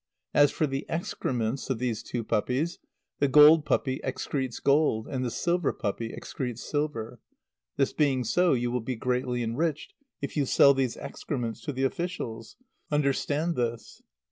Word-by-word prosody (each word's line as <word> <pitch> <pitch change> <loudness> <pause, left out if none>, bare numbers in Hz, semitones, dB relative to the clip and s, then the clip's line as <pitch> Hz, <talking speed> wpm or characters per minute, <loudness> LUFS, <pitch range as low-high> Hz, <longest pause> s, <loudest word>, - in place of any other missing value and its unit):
As 145 0 +6
for 155 - 0
the 135 -1 -3
excrements 130 -7 -2
of 130 - 0
these 120 -2 -2
two 120 -2 -4
puppies, 125 +10 -1 0.4
the 140 - +3
gold 150 +3 +7
puppy 130 -3 0
excretes 130 -1 -3
gold 140 -6 +2
and 130 -1 -2
the 125 - -1
silver 170 +5 0
puppy 115 +2 -3
excretes 125 -3 -5
silver. 125 -6 -3 0.6
This 135 -1 +1
being 135 -4 +2
so, 175 +9 +3
you 120 -1 0
will 125 0 -1
be 125 +3 -3
greatly 125 +1 -1
enriched 145 +7 -2 0.3
if 140 - -5
you 145 -3 +1
sell 140 +2 +6
these 135 -3 -1
excrements 120 -5 -4
to 150 - -1
the 135 -1 -2
officials. 130 -7 -3 0.3
Understand 150 +3 0
this!" 120 -2 -3
130 Hz, 155 wpm, -28 LUFS, 120-150 Hz, 0.6 s, gold